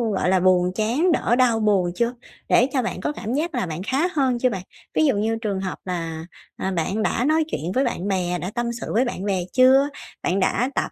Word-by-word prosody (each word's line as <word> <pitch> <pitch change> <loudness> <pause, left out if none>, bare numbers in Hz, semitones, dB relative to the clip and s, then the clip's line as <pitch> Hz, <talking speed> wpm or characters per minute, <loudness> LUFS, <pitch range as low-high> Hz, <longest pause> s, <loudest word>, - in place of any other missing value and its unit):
gọi 180 - +1
là, 185 0 +4
buồn 180 -1 +3
chán, 245 - +1
đỡ 240 -7 +2
đau 245 -3 +3
buồn 200 -5 +2
chưa, 235 +4 0 0.4
để 245 - +5
cho 265 - +2
bạn 235 - -4
có - - -1
cảm 235 -5 -5
giác 325 +5 -1
là - - 0
bạn 165 +1 -5
khá 270 - +1
hơn 260 -4 +1
chưa 255 - +3
bạn? 195 -6 -5 0.3
Ví 155 0 +3
dụ - - +3
như 220 +2 0
trường 205 -4 -2
hợp 185 -1 -4
là, 165 -3 -4 0.3
ờ, 190 - -2
bạn 190 +5 -1
đã 240 - 0
nói 315 +1 +3
chuyện 165 +4 -3
với 265 - +3
bạn 200 -6 -2
bè, 180 -2 0
đã 180 +3 -4
tâm 240 -1 -1
sự - - -4
với 240 +4 +3
bạn 205 -5 -4
bè 195 -2 0
chưa? 265 +2 +6 0.4
Bạn 185 +3 +1
đã 240 +6 +1
tập - - -1
215 Hz, 240 wpm, -23 LUFS, 185-255 Hz, 0.4 s, chưa